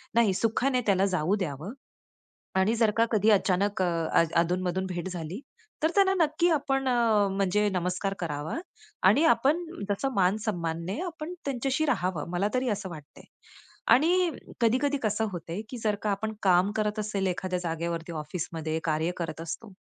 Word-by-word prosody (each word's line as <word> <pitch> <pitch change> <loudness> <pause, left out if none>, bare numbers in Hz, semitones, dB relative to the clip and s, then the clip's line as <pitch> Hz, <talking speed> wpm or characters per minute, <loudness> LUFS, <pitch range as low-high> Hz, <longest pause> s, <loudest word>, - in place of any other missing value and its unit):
नाही, 230 -4 +4
सुखाने 250 +5 +1
त्याला 195 -1 +4
जाऊ 180 +5 +1
द्यावं. 165 - -4 0.8
आणि 195 +5 +3
जर 225 -2 +3
का 230 - +6
कधी 215 0 +4
अचानक 195 0 +2
अ, 165 -2 +2
अधूनमधून 180 +2 +1
भेट 180 -1 -4
झाली 175 +3 -5 0.4
तर 315 - +3
त्यांना 390 -1 +5
नक्की 325 +1 +2
आपण 270 -3 0 0.5
म्हणजे 200 +2 +2
नमस्कार 185 +2 -1
करावा 155 - -3 0.5
आणि 315 - +5
आपण 295 0 +4 0.3
जसं 205 +7 0
मानसन्मानाने 180 - 0
आपणं 330 -1 -6
त्यांच्याशी 270 +2 0
राहावं, 185 - -1
मला 185 +4 +1
तरी 255 0 +1
असं 200 -2 -3
वाटतं 150 -4 -11
आहे. - - -14 0.7
आणि 345 +6 +3 0.3
कधी-कधी 260 +5 +2
कसं 215 +1 +1
होतं 165 -2 -6
आहे 205 - -3
की 250 - -6
जर 215 -2 0
का 210 - 0
आपण 215 +2 -2
काम 185 +1 +4
करत 215 0 0
असेल 205 -2 -1
एखाद्या 185 0 -1
जागेवरती, 170 0 -3
ऑफिसमध्ये 160 0 -3
कार्य 160 +1 0
करत 165 -2 -4
असतो 190 +5 -6
195 Hz, 155 wpm, -28 LUFS, 175-230 Hz, 0.8 s, का